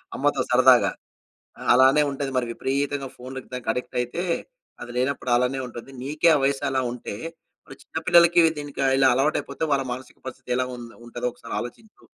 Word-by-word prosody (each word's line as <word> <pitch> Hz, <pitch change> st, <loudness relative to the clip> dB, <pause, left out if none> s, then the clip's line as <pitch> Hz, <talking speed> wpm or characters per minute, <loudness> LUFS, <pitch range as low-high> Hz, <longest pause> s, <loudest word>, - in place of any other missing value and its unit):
అమ్మతో -, -, +1 dB
సరదాగా, -, -, +6 dB, 0.8 s
అలానే 130 Hz, +4 st, +6 dB
ఉంటది 140 Hz, 0 st, -3 dB
మరి 125 Hz, -, +1 dB
విపరీతంగా 140 Hz, +2 st, -2 dB
ఫోన్‌కి 130 Hz, +1 st, -8 dB
దానికి 125 Hz, -2 st, -4 dB
అడిక్ట్ 125 Hz, -, -6 dB
అయితే, 125 Hz, +9 st, -3 dB, 0.6 s
అది 120 Hz, 0 st, -7 dB
లేనప్పుడు 130 Hz, 0 st, -1 dB
అలానే 125 Hz, +2 st, 0 dB
ఉంటది. 120 Hz, +2 st, -10 dB
నీకే 150 Hz, +5 st, +2 dB
ఆ -, -, +4 dB
వయసు 140 Hz, 0 st, 0 dB
అలా 130 Hz, -1 st, +1 dB
ఉంటే, 120 Hz, -4 st, -6 dB, 0.5 s
మరి -, -, -12 dB
చిన్న -, -, -8 dB
పిల్లలకి 170 Hz, 0 st, +6 dB, 0.2 s
దీనికి 145 Hz, -1 st, -4 dB
ఇలా 135 Hz, -1 st, +5 dB
అలవాటైపోతే 145 Hz, +4 st, -1 dB
వాళ్ళ 135 Hz, -1 st, 0 dB
మానసిక 130 Hz, 0 st, -10 dB
పరిస్థితి 130 Hz, 0 st, -8 dB
ఎలా 130 Hz, 0 st, 0 dB
ఉం 120 Hz, -, -8 dB, 0.2 s
ఉంటదో 120 Hz, +1 st, -3 dB
ఒకసారి 115 Hz, -, -8 dB
ఆలోచించు. 165 Hz, -, -11 dB
130 Hz, 165 wpm, -24 LUFS, 125-140 Hz, 0.8 s, సరదాగా